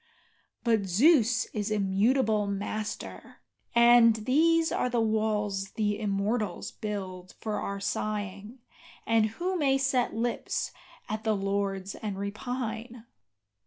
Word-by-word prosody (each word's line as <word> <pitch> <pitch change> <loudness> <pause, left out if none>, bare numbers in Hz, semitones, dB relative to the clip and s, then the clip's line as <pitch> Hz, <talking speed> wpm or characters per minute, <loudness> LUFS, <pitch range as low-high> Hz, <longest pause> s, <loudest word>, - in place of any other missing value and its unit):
But 225 -4 +2
Zeus 245 - +4
is 210 -1 -2
immutable 210 +2 +2
Master, 205 +2 -5 0.4
and 235 -1 +7
these 320 +9 +2
are 250 - 0
the 240 -1 0
walls 210 -3 0
the 210 -1 -1
immortals 210 +1 -1
Build 185 -4 -6
for 215 -1 -3
our 200 0 -4
sighing, 205 +2 -3 0.5
and 225 -1 +3
who 355 - -3
may 270 -3 +3
set 265 -4 +1
lips 235 +1 -2 0.4
at 215 0 -4
the 220 -1 +1
lords 195 0 -2
and 205 -3 -5
repine? 225 +3 -5
215 Hz, 115 wpm, -28 LUFS, 200-240 Hz, 0.5 s, and